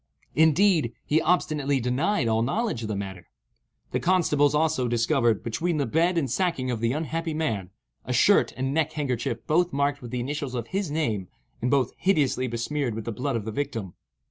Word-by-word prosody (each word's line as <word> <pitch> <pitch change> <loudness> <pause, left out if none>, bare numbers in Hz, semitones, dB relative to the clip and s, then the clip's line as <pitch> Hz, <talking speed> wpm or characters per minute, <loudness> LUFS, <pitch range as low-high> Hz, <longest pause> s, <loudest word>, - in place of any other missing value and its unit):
Indeed, 160 - +4
he 155 +2 +2
obstinately 150 -6 +1
denied 125 - 0
all 110 0 +2
knowledge 205 - -1
of 110 - -4
the 105 - -2
matter. 95 -3 -6 0.6
The - - 0
constables, 150 -5 +3
also, 155 -5 +1
discovered, 120 -1 +2
between 165 +9 -1
the 140 - +1
bed 170 +8 +1
and 150 -5 +1
sacking 130 -2 0
of 120 - -2
the 115 +1 +1
unhappy 160 +2 -2
man, 110 - -2 0.3
a - - -5
shirt - - +4
and 135 +1 -1
neck 155 0 +1
handkerchief 125 -6 -2
both 175 +3 +2
marked 140 0 0
with 120 - -8
the 125 +1 -3
initials 140 +1 -3
of 120 -2 -4
his 195 -2 -2
name, 115 - -1 0.3
and 125 - 0
both 130 -2 +2
hideously 145 -9 +1
besmeared 120 +1 -2
with 115 - -5
the 115 - -2
blood 130 +5 -2
of 110 -3 -2
the 110 - -3
victim. 115 -7 -4
140 Hz, 190 wpm, -26 LUFS, 115-160 Hz, 0.6 s, Indeed